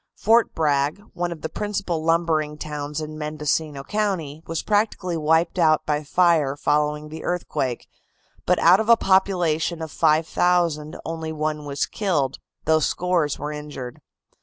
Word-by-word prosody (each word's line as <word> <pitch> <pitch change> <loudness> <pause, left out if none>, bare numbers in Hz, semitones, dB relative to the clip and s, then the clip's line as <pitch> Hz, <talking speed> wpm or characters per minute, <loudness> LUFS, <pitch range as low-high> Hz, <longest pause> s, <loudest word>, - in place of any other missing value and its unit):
Fort 225 +2 +3
Bragg, 150 +2 +1
one 175 0 -2
of 170 - -7
the - - -1
principal 195 -5 -3
lumbering 160 -2 +1
towns 150 0 -5
in 155 0 -7
Mendocino 150 -1 -2
County, 180 -7 -2
was 165 -1 -3
practically 205 -4 0
wiped 160 +3 +1
out 155 -2 +3
by 150 0 -1
fire 155 -3 +2
following 150 +1 0
the 160 +1 -8
earthquake, 135 -8 -2 0.6
but - - +4
out 180 +4 +6
of 220 +1 -1
a 235 - +8
population 180 -5 +1
of 160 -2 -6
5,000 160 0 +1
only 160 -1 -4
one 155 -1 -3
was 140 0 -1
killed, 150 -11 -1 0.3
though 160 0 +4
scores 170 -2 0
were 150 - -4
injured. 150 -5 -7
160 Hz, 145 wpm, -23 LUFS, 150-175 Hz, 0.6 s, a